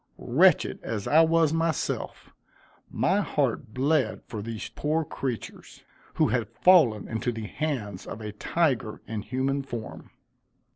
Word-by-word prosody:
Wretched - - +3
as 105 -3 -4
I 155 +2 +6
was 165 -1 +3
myself, 165 -2 -2 0.6
my 195 +3 +1
heart 130 - -1
bled 140 +4 0
for 110 -3 -6
these 110 0 -5
poor 155 +2 -1
creatures, 130 -5 -6 0.3
who - - +3
had - - 0
fallen 150 - +4
into 115 +2 -2
the 115 -2 -6
hands 110 -8 -4
of 105 - -6
a 105 -1 -6
tiger 130 0 -1
in 110 -2 -4
human 130 +5 -1
form. 120 -5 -7
130 Hz, 135 wpm, -27 LUFS, 110-155 Hz, 0.6 s, I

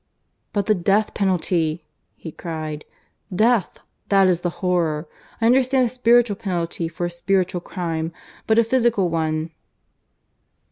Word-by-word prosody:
"But 205 -2 -1
the 215 - +3
death 200 +3 +1
penalty!" 170 -4 0 0.3
he 160 - -9
cried. 155 -2 -6 0.5
"Death! 225 0 +2 0.3
that 195 -1 +5
is 175 -2 +1
the 175 - 0 0.2
horror. 165 -4 0 0.3
I 225 - +1
understand 255 +2 +4
a - - -1
spiritual 240 -3 +3
penalty 170 -5 -2
for 175 +1 -4
a - - -1
spiritual 180 0 0
crime 165 -3 -3 0.4
but 220 - +3
a 230 - +6
physical 230 -6 +1
one. 160 0 -1
180 Hz, 135 wpm, -22 LUFS, 165-220 Hz, 0.5 s, a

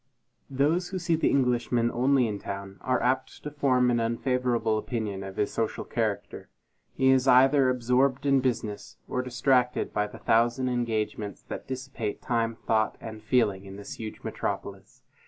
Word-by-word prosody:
Those 150 +7 +1
who 190 - -3
see 170 -2 +1
the 160 - +2
Englishman 120 -2 +1
only 130 0 +3
in 105 -2 -4
town, 100 0 -7
are 130 - +1
apt 130 +1 -1
to 150 - -5
form 130 -4 +2
an 120 - +2
unfavorable 120 -1 0
opinion 105 -4 -3
of 95 -1 -7
his 105 - 0
social 115 -1 -2
character. - - -3 0.5
He 130 - +3
is 130 0 +3
either 130 +1 +6
absorbed 130 +2 +1
in 140 -1 +4
business, 115 -5 -3
or 125 - -1
distracted 125 0 +1
by 105 0 0
the 115 - -11
thousand 120 +3 +2
engagements 110 -4 -2
that - - -6
dissipate 130 -5 -4
time, 115 -1 -1
thought, 110 -1 0
and 110 -1 -8
feeling, 105 -4 +1
in 95 0 -9
this 100 0 -9
huge 110 -2 -7
metropolis. - - -5
125 Hz, 160 wpm, -27 LUFS, 110-130 Hz, 0.5 s, either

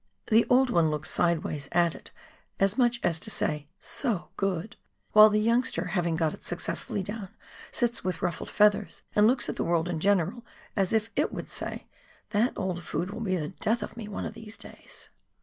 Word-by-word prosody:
The 225 +2 +5
old 255 0 +4
one 165 -7 +3
looks 150 0 -2
sideways 155 -4 0
at 170 -1 +3
it - - -12 0.5
as 195 +1 +3
much 240 -1 +2
as 165 -2 +2
to - - -3
say, 150 -1 -1
" - - -49 0.2
So 230 -10 -1
good," 195 0 -2 0.4
while 215 0 +9
the 210 0 +2
youngster 230 -5 +1
having 175 -4 +1
got 160 -2 0
it - - -12
successfully 185 +2 -2
down 205 0 -6 0.4
sits 240 -1 0
with 185 -2 -2
ruffled 175 - -2
feathers 210 -1 +2
and 210 +1 +6
looks 245 +1 +2
at - - -4
the - - 0
world 170 0 +1
in 175 -3 -2
general 200 +4 +1 0.3
as 195 -3 +1
if 225 0 +1
it 295 - +1
would - - -6
say, - - -4 0.5
"That 220 +4 +2
old 185 -3 -2
fool 170 - -2
will 205 +4 -7
be 195 -5 0
the 150 -3 -3
death 220 +5 -1
of - - -8
me 225 -3 -7
one 210 - -4
of - - -5
these 220 -1 -10
days - - -11
200 Hz, 200 wpm, -28 LUFS, 170-225 Hz, 0.5 s, while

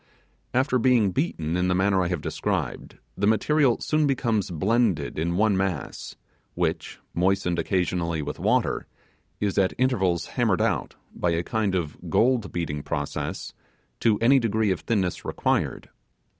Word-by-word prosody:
After 130 0 +2
being 115 -5 +3
beaten 85 - -1
in 90 0 +1
the 90 - +2
manner 95 0 +2
I - - 0
have 90 -3 -2
described, - - -3 0.2
the 100 - 0
material 125 +4 +3
soon 155 -1 +1
becomes 115 -8 0
blended 95 +1 0
in 85 +2 -1
one 105 -1 +3
mass, 95 -6 -3 0.4
which, - - -2 0.2
moistened 90 -1 +1
occasionally 85 -3 0
with 70 - -5
water, - - +1 0.5
is 100 -1 0
at 95 -1 +2
intervals 95 -10 +1
hammered - - 0
out, - - 0 0.2
by 90 - -1
a 85 0 0
kind 105 -1 -1
of 80 -5 -4
gold 120 -4 +2
beating 75 -4 -3
process, 70 0 -4 0.5
to 110 -2 +3
any 135 +4 +6
degree 110 -3 +1
of 95 - -1
thinness 95 -6 -1
required. - - -1
95 Hz, 145 wpm, -25 LUFS, 85-115 Hz, 0.5 s, any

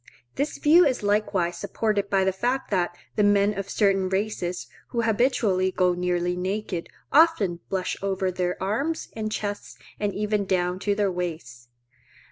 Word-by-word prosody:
This 285 +2 -2
view 330 +4 +6
is 260 -8 +1
likewise 205 -4 +1
supported 205 -3 -1
by 195 -1 +3
the 190 0 +1
fact 245 +7 -1
that 175 -2 0 0.2
the 210 - +4
men 205 0 +3
of 195 0 -5
certain 195 -3 +2
races, 190 -2 -2 0.2
who 235 -1 -1
habitually 220 -5 +2
go 180 -1 +2
nearly 180 0 0
naked, 185 -1 -3 0.2
often 280 - +4
blush 185 -1 -1
over 190 -1 -1
their 180 0 -2
arms 275 +12 -2
and 215 -1 -4
chests 205 -1 -4 0.2
and 205 -1 0
even 210 0 0
down 180 -1 0
to 200 +1 0
their 205 -2 +1
waists. 160 -9 -5
195 Hz, 155 wpm, -25 LUFS, 180-215 Hz, 0.2 s, view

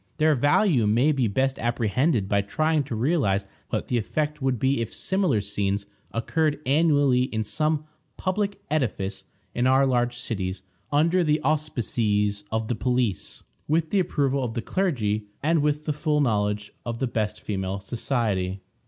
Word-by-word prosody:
Their 155 0 +4
value 145 - +3
may 120 +8 +4
be 135 -5 +1
best 130 +6 0
apprehended 120 - +1
by 100 0 +2
trying 155 +9 +1
to 125 - -4
realize 110 - +1 0.2
what - - -2
the 120 - +1
effect 150 +6 -2
would 130 -2 +1
be 130 +1 +1
if 115 - -3
similar 190 - +1
scenes 100 0 -2 0.3
occurred 150 +6 0
annually 140 -3 +3
in 110 -3 -2
some 155 +7 -1 0.3
public 200 +2 -1
edifice 105 -9 -1 0.3
in 120 +1 +1
our 135 +1 +5
large 120 -2 +1
cities, 95 -7 -4 0.3
under 165 +5 +3
the 155 -1 +2
auspices 110 -9 0
of 110 0 -1
the 120 - 0
police, 125 -3 -1 0.2
with 160 +1 +1
the 200 - +3
approval 140 -6 +1
of 115 -2 -3
the 115 - -2
clergy, 110 - 0 0.2
and 160 +1 +3
with 150 +1 0
the 150 - 0
full 150 0 0
knowledge 105 -5 0
of 115 -1 -4
the 130 - 0
best 110 -4 -2
female 95 -1 -3
society. 100 -4 -1
125 Hz, 160 wpm, -25 LUFS, 105-150 Hz, 0.3 s, our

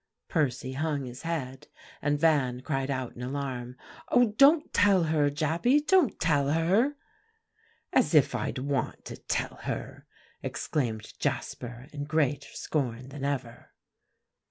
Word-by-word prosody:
Percy 135 -4 0
hung 145 -1 -1
his 125 0 -8
head; 145 -6 -4 0.3
and 145 0 +1
Van 140 -6 +2
cried 135 -1 -2
out 130 -3 -3
in 120 - -9
alarm, 125 -2 -4 0.3
"Oh, 245 -3 +4
don't 295 +4 +5
tell 195 -3 +5
her, 155 -2 +2
Jappy, 160 - +2
don't 360 - +3
tell 145 -4 +2
her!" 190 - +2 1.0
"As - - +3
if - - +5
I'd - - -2
want 135 -1 -2
to - - -7
tell - - -3
her," - - -6 0.3
exclaimed 115 -7 -3
Jasper 120 +1 -3
in 145 -1 -4
greater 145 -2 0
scorn 130 -4 -2
than 140 0 -8
ever. 130 -4 -4
145 Hz, 130 wpm, -28 LUFS, 130-160 Hz, 1.0 s, don't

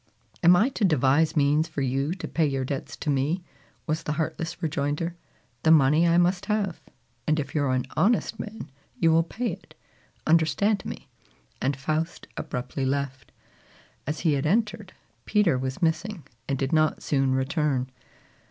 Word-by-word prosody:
"Am 175 +1 +7
I 220 +9 +4
to 250 - -3
devise 150 -2 +3
means 150 +2 +3
for 140 - -3
you 135 +6 0
to 185 - -6
pay 160 -2 +1
your 135 -2 -1
debts 135 0 -5
to 150 - -1
me?" 145 +7 0 0.4
was 160 +1 -1
the 150 - -2
heartless 160 +1 -3
rejoinder. 150 +2 -1 0.5
"The 160 - +2
money 155 +2 +5
I 170 0 +4
must 180 +1 +2
have; 210 -5 -1 0.5
and 155 0 +2
if 140 -1 -4
you 150 - +1
are 140 - +1
an 130 -1 0
honest 225 +1 +2
man, 215 -8 -7 0.3
you 165 -1 +4
will 165 +1 +5
pay 225 +8 -3
it: - - -11 0.5
understand 170 +6 +2
me!" - - -7 0.5
and 135 +1 0
Faust 155 +4 -2
abruptly 125 +2 -4
left. 135 -1 -2 0.8
As 150 +1 -2
he 160 - +3
had 140 +1 0
entered, 210 +1 0 0.3
Peter 210 -8 +3
was 130 +6 -3
missing, 170 +3 0 0.3
and 135 - 0
did 135 +2 -2
not 155 -1 +2
soon 135 -2 +1
return. 130 -1 0
155 Hz, 165 wpm, -26 LUFS, 140-175 Hz, 0.8 s, Am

